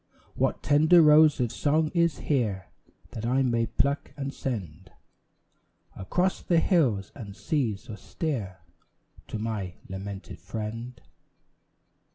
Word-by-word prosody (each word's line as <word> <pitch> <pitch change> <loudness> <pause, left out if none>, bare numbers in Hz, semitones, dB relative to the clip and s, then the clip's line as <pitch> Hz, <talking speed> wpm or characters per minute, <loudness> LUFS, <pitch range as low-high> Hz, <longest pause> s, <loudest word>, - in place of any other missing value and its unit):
What - - -1
tender 155 +4 +5
rose 150 0 +6
of 120 -3 0
song 155 +5 +1
is 170 -1 +1
here 105 - -1 0.4
That 115 -3 -6
I 130 +3 +2
may 115 -2 +1
pluck 140 +5 -1
and 140 -1 -4
send 95 - -5 1.0
Across 180 - -1
the 170 -2 +2
hills 130 - +1
and 105 -7 -9
seas 115 -7 -2
austere 105 - -4 0.7
To - - -4
my 105 -5 -4
lamented 95 +1 -7
friend? 115 +3 -6
120 Hz, 115 wpm, -27 LUFS, 100-150 Hz, 1.0 s, rose